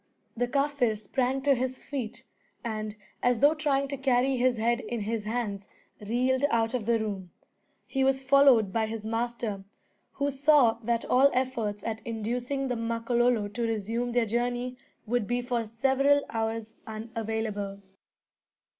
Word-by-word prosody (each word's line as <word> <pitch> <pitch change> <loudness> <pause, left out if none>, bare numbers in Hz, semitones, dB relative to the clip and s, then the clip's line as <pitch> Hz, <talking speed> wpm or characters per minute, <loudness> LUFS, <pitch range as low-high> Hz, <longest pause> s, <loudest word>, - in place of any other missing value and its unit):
The 245 +1 0
Kaffir 275 -4 +1
sprang 255 +5 -1
to 285 0 +5
his 260 0 -1
feet, 260 -6 -6 0.4
and, 215 -2 -4 0.3
as 245 -2 +2
though 290 +3 +6
trying 285 -3 0
to 280 - -3
carry 265 0 +2
his 250 -1 +2
head 235 +2 +1
in 240 -3 -4
his 215 0 -2
hands, 215 -3 -3 0.3
reeled 250 +5 0
out 225 0 +1
of 235 -4 -2
the 235 -1 +4
room. 200 -4 -4 0.6
He 270 -1 0
was 265 0 +3
followed 270 -6 +5
by 225 -1 +1
his 220 -1 -5
master, 225 -3 -2 0.5
who 280 +1 -1
saw 270 -4 +4
that 235 0 0
all 265 +3 +5
efforts 235 -6 -1
at 225 -1 -3
inducing 245 +4 -2
the 250 - -1
Makololo 230 -1 +1
to 215 +4 -5
resume 225 +2 -2
their 240 -1 +3
journey 245 +2 -1 0.3
would 235 -2 0
be 245 +1 0
for 240 -2 -2
several 270 +5 +3
hours 225 0 -2
unavailable. 220 -3 -4
235 Hz, 150 wpm, -28 LUFS, 220-260 Hz, 0.6 s, though